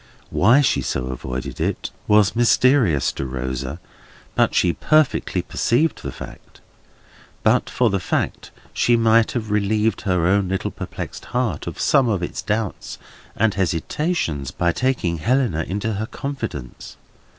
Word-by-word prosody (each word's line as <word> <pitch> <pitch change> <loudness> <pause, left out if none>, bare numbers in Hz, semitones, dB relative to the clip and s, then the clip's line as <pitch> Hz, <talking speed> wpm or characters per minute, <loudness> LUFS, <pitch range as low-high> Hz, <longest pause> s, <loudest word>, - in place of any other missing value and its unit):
Why 120 +9 +5
she 140 - +2
so 65 -1 -2
avoided 65 0 -5
it, - - -2 0.2
was 105 -1 +4
mysterious 120 - +3
to 70 - -5
Rosa, 65 +3 -4 0.5
but - - +2
she 85 - +3
perfectly 155 -2 +1
perceived 150 +8 0
the - - -5
fact. - - -11 0.8
But - - +3
for 120 -4 +1
the 100 - 0
fact, - - -2 0.2
she 120 - +3
might 115 0 +3
have 110 -4 -3
relieved 105 +1 +1
her 90 -3 +1
own 95 +1 +2
little 95 0 -2
perplexed - - -7
heart 120 -10 -2
of - - -6
some 130 -4 +3
of 95 -5 0
its - - -4
doubts 105 -1 -3 0.4
and 110 -1 +2
hesitations, 90 - -1
by 85 +4 0
taking 95 -9 -1
Helena 115 - +1
into 105 +4 -2
her 110 +2 -3
confidence. 130 - -6
105 Hz, 140 wpm, -21 LUFS, 85-120 Hz, 0.8 s, Why